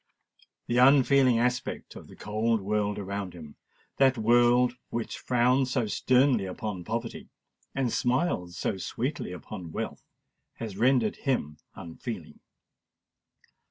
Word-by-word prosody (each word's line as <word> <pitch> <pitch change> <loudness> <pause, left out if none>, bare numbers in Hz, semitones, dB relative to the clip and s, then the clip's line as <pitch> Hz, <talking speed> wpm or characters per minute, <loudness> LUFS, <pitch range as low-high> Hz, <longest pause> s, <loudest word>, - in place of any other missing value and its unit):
The 120 +1 +1
unfeeling 135 -1 +5
aspect 125 +1 -2
of - - -11
the - - -14
cold 110 +2 0
world 105 +1 -1
around 100 -2 -5
him—that 105 - -2
world 120 +2 +4 0.2
which 115 -1 -4
frowns 125 +2 +2
so 125 -3 0
sternly 125 0 +2
upon 95 -1 -5
poverty, 115 +4 -5 0.5
and 130 -4 0
smiles 125 - 0
so 100 - -1
sweetly 125 +3 -3
upon 90 -1 -8
wealth—has 110 +5 -8
rendered 120 -1 +2
him 75 - -2 0.2
unfeeling. 85 +2 -8
115 Hz, 110 wpm, -28 LUFS, 100-125 Hz, 0.5 s, unfeeling